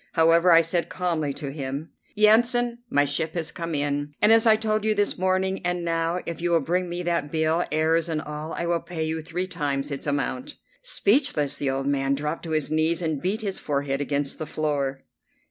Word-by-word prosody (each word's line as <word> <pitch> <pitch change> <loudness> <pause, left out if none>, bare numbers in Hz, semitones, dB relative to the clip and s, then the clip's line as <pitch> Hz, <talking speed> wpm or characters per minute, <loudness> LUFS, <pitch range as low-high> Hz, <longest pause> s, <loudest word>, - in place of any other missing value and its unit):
However, 165 +2 +5
I 165 0 +8
said 165 0 -1
calmly 165 -5 -1
to 140 0 -5
him: 140 +2 -5 0.3
"Yansan, 235 +3 +4
my 145 -6 +3
ship 155 +3 -2
has 165 -2 -2
come 165 -2 -4
in, 145 0 -2
as 225 +2 +5
I 220 - +7
told 215 -1 -1
you 215 0 +2
this 205 0 +1
morning; 190 +1 0
and 180 -1 -1
now, 165 +1 0
if 170 0 -5
you 175 - 0
will 170 -1 +4
bring 180 +4 -1
me 175 +1 -4
that 170 -4 -1
bill, 160 +1 +1
errors 160 +2 +2
and 160 -2 -1
all, 150 +1 -6
I - - -3
will 170 0 0
pay 170 -1 -4
you 160 0 -2
three 175 +3 -3
times 145 -5 -2
its 140 +1 -5
amount." 255 - -2 0.3
Speechless, 200 - +1
the 140 - 0
old 135 0 -2
man 140 -1 +1
dropped 150 +4 -4
on 160 - -3
his 155 -2 0
knees 160 +1 +2
and 155 -4 -1
beat 200 +5 -1
his 200 -3 -3
forehead 140 -1 -1
against 145 0 -2
the 155 - -4
floor. 140 -3 -2
165 Hz, 205 wpm, -25 LUFS, 145-180 Hz, 0.3 s, I